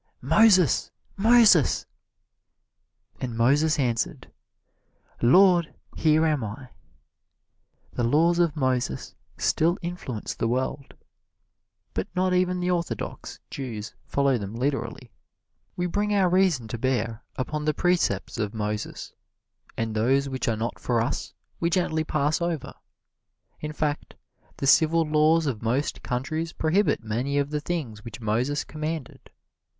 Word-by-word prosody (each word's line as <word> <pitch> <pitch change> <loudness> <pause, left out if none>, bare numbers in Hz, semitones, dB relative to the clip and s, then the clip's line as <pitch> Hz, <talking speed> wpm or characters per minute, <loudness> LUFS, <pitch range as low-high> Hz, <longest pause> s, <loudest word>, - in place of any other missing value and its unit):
"Moses, 185 - +4 0.3
Moses!" 215 - +5 1.3
And 120 -3 -4
Moses 145 +6 +3
answered, 120 -5 -2 0.9
"Lord, 175 +5 +5 0.2
here 155 0 +3
am 150 -5 +1
I." 110 +5 -7 1.2
The 120 - -2
laws 165 +8 +3
of 170 -3 +2
Moses 130 - -1 0.2
still 170 +3 +2
influence 170 -10 -5
the 115 - -2
world, 130 +3 -2 1.0
but 95 - -2
not 185 0 +1
even 180 0 +1
the 180 0 0
orthodox 170 - -4
Jews 115 -6 -6
follow 140 -3 +1
them 100 +1 -6
literally. 125 -2 -3 0.6
We 175 - -1
bring 205 +4 0
our 190 -3 +3
reason 180 -10 +2
to 115 - -5
bear 120 -3 -1
upon 150 +4 -3
the 155 - +2
precepts 180 -8 0
of 105 0 -2
Moses, 105 0 -4 0.6
and 115 -1 -2
those 130 +6 +2
which 130 -1 -3
are 115 -2 +1
not 115 +2 -3
for 120 -2 0
us 115 - -2 0.3
we 170 - +1
gently 165 -3 0
pass 155 +2 0
over. 170 -4 -2 0.9
In 150 - -5
fact, 150 -1 -3 0.4
the - - -3
civil 160 +4 +5
laws 155 +1 +3
of 125 -7 -2
most 125 +6 -1
countries 155 +6 -3
prohibit 165 - +1
many 125 +6 -2
of 145 0 0
the 150 -1 -2
things 140 -11 -4
which 115 +1 -9
Moses 120 +6 0
commanded. 155 -2 -6
145 Hz, 130 wpm, -25 LUFS, 120-170 Hz, 1.3 s, Moses